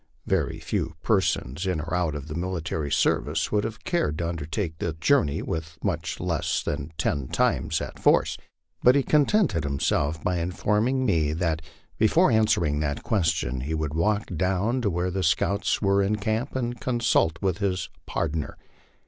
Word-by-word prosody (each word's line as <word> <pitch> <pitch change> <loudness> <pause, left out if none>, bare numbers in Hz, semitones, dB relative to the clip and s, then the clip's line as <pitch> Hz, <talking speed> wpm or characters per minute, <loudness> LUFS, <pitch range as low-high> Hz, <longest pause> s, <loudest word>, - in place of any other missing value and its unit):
Very - - 0
few 80 - -3
persons 95 - 0
in 90 -4 0
or 80 +3 -5
out 90 -4 0
of 75 0 -6
the 75 - -5
military 85 -3 -3
service 75 +3 +1
would 105 -1 +2
have 110 - -5
cared 170 - 0
to 85 - -1
undertake 80 +1 -3
the 80 - -2
journey 80 - +2
with 80 -1 -4
much - - -2
less - - -1
than 70 +4 -3
ten 70 -5 -1
times 75 +6 +1
that - - -5
force, - - +3 0.5
but 125 +2 +6
he 140 - +3
contented 150 - +3
himself 75 +2 0
by 90 -1 0
informing 105 +9 0
me 80 -8 +2
that 80 -1 -1 0.4
be 110 - +5
fore 170 +5 +4
answering 85 -9 +2
that 70 -1 -2
question 80 - 0
he 75 +5 -2
would 75 -2 -2
walk 105 +6 +1
down 95 +8 0
to 105 - +1
where 90 0 -1
the 95 +1 -1
scouts 95 +6 +1
were 100 0 +3
in 100 +2 +1
camp 110 +6 -2
and 120 -3 -2
consult 115 -10 +2 0.2
his 95 -3 -1 0.2
"pardner." 80 -2 -2
85 Hz, 165 wpm, -26 LUFS, 80-105 Hz, 0.5 s, but